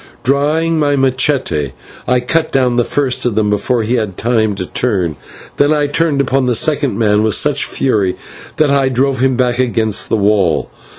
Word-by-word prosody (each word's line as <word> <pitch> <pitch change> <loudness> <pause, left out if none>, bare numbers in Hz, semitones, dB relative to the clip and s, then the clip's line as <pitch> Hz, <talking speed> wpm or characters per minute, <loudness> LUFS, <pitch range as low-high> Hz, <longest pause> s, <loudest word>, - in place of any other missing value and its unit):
Drawing 155 +4 +1
my 145 -1 +1
/machete/, 130 - 0 0.3
I 125 0 +2
cut 160 +6 -1
down 125 -2 +1
the 120 - +2
first 130 0 -1
of 120 -4 -1
them 105 -1 +1
before 110 +3 0
he 120 +3 0
had 105 -5 -3
time 110 -3 0
to 95 -1 -4
turn, 90 - -2 0.4
then 145 +1 +3
I 150 -1 +1
fell 150 -1 0
upon 135 -1 0
the 125 - +1
second 145 +2 0
man 105 -2 +2
with 110 -1 +2
such 145 -1 +2
fury 105 -8 0 0.4
that 150 -2 +2
I 135 -1 +2
drove 130 +1 0
him 130 0 +2
back 125 -1 0
against 115 -4 0
the - - +1
wall. 100 -6 +1
125 Hz, 185 wpm, -14 LUFS, 110-140 Hz, 0.4 s, then